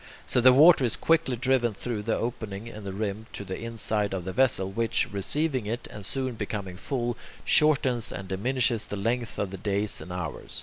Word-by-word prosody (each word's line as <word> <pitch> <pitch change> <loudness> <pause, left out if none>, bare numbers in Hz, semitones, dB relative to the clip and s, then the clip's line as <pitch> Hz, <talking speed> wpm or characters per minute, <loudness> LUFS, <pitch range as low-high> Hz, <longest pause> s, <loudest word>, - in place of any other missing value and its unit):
So 125 - +1
the 130 +1 +8
water 150 +3 +7
is 120 - +2
quickly 160 -6 +2
driven 120 -2 +1
through 115 0 -3
the 110 +2 0
opening 110 -3 -4
in 110 -3 -9
the 100 - -4
rim 105 +2 -4
to - - -4
the 95 -1 -5
inside 110 -3 -2
of 90 -2 -5
the 95 - -4
vessel, 95 -5 +2
which, 115 +3 +1
receiving 130 +5 -1
it 115 +3 -3
and 105 - -9
soon 130 +5 -2
becoming 105 -4 -4
full, 120 +4 -2 0.3
shortens 135 -6 +3
and 95 +1 -6
diminishes 115 +3 0
the - - -4
length 115 +3 -2
of 100 -2 -2
the 95 - -6
days 100 +2 -1
and 90 - -9
hours. 85 -6 -5
110 Hz, 200 wpm, -27 LUFS, 100-125 Hz, 0.3 s, the